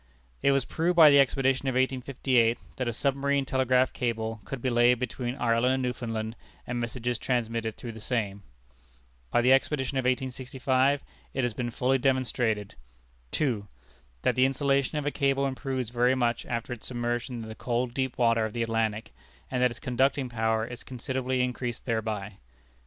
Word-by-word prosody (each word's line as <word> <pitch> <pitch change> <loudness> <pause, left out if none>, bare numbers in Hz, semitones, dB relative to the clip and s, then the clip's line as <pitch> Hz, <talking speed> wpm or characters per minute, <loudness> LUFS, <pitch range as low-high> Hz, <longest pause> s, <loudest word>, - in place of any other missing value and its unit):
It 140 - +4
was 135 -2 +2
proved 175 +2 0
by 160 -3 +9
the 140 - +7
expedition 135 0 +2
of 130 - +1
1858, 130 -2 +2 0.2
that 130 -2 -2
a - - +1
Submarine 140 +3 0
Telegraph 130 -1 +2
Cable 115 -3 -2
could 135 - -5
be 130 +1 -1
laid 120 +1 +5
between 125 0 -3
Ireland 120 0 +2
and 130 - -2
Newfoundland, 115 -3 -3 0.3
and 120 0 -3
messages 120 0 -2
transmitted 115 -3 -1
through 120 - -6
the 110 - -10
same. 105 -4 -2 0.9
By 120 - +3
the 125 +2 +5
expedition 135 0 +1
of 130 - -2
1865 130 +1 +1 0.3
it 130 - 0
has 120 -2 0
been 120 +1 -3
fully 130 +3 +1
demonstrated: 125 -5 0 0.6
2. 115 - -1 0.6
That - - +3
the 130 0 +5
insulation 140 +2 +1
of 150 - -2
a 145 - +1
cable 140 -1 +1
improves 130 -3 -3
very 125 +1 +3
much 120 -2 0
after 120 +1 -3
its 120 - -6
submersion 120 0 -3
in - - -8
the 110 - -6
cold 120 +1 -2
deep 130 -1 -2
water 115 -2 +3
of 110 -1 -3
the 120 - -1
Atlantic, 115 -1 -1 0.4
and 125 -1 0
that 125 - +5
its 115 - -8
conducting 130 +1 +1
power 110 -1 0
is 120 0 -8
considerably 130 0 -2
increased 125 -1 -3
thereby. 110 -4 -2
125 Hz, 175 wpm, -28 LUFS, 115-130 Hz, 0.9 s, by